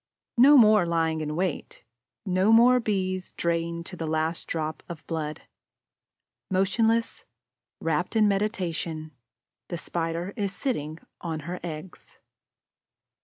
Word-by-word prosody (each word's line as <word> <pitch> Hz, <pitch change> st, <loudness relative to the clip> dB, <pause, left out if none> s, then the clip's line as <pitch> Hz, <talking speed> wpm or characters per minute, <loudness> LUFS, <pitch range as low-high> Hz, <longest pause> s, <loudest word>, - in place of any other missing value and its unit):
No 285 Hz, +4 st, +8 dB
more 215 Hz, -6 st, +6 dB
lying 160 Hz, -1 st, 0 dB
in 150 Hz, 0 st, -3 dB
wait, 180 Hz, -2 st, -3 dB, 0.4 s
no 185 Hz, +2 st, +2 dB
more 245 Hz, +3 st, +7 dB
Bees 185 Hz, -4 st, -2 dB
drained 170 Hz, 0 st, -2 dB
to 180 Hz, -, -6 dB
the 165 Hz, -2 st, -4 dB
last 160 Hz, +1 st, -1 dB
drop 155 Hz, -1 st, -3 dB
of 170 Hz, -3 st, -8 dB
blood. 155 Hz, -2 st, -4 dB, 1.1 s
Motionless, 225 Hz, +5 st, +1 dB, 0.6 s
rapt 165 Hz, +6 st, -1 dB
in 215 Hz, -1 st, +5 dB
meditation, 175 Hz, -6 st, -2 dB, 0.6 s
the 175 Hz, -, -4 dB
Spider 170 Hz, +2 st, -3 dB
is 200 Hz, -4 st, -1 dB
sitting 155 Hz, -, -2 dB, 0.2 s
on 160 Hz, -3 st, -4 dB
her 175 Hz, +4 st, -5 dB
eggs. 165 Hz, +1 st, -8 dB
175 Hz, 120 wpm, -26 LUFS, 160-205 Hz, 1.1 s, No